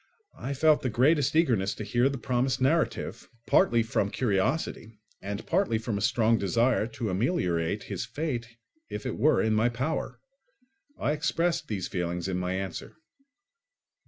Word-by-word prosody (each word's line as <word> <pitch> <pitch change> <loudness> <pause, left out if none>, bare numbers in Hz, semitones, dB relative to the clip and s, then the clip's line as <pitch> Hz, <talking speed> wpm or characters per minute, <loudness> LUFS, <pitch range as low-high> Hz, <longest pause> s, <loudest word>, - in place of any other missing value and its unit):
I 140 +3 -3
felt 155 +2 +4
the 130 - -1
greatest 140 +4 +3
eagerness 115 - +2
to - - -6
hear 120 +5 +2
the 140 - -4
promised 125 +2 0
narrative, 155 +5 0 0.2
partly 115 -1 +4
from 105 -3 0
curiosity 110 +1 -1 0.2
and 100 +2 -5
partly 180 - +1
from 110 -1 -3
a 100 - -2
strong 115 +2 +2
desire 115 +3 +2
to 115 -3 -4
ameliorate 90 - 0
his - - -4
fate 135 -7 -3 0.4
if - - -6
it - - -2
were 155 - +3
in 110 -1 +2
my 110 +3 +3
power. 130 +7 -3 0.8
I - - 0
expressed 165 +2 0
these 100 -5 -3
feelings 90 0 -3
in 95 -1 -1
my 90 0 -2
answer. 95 +8 -5
115 Hz, 155 wpm, -28 LUFS, 100-140 Hz, 0.8 s, felt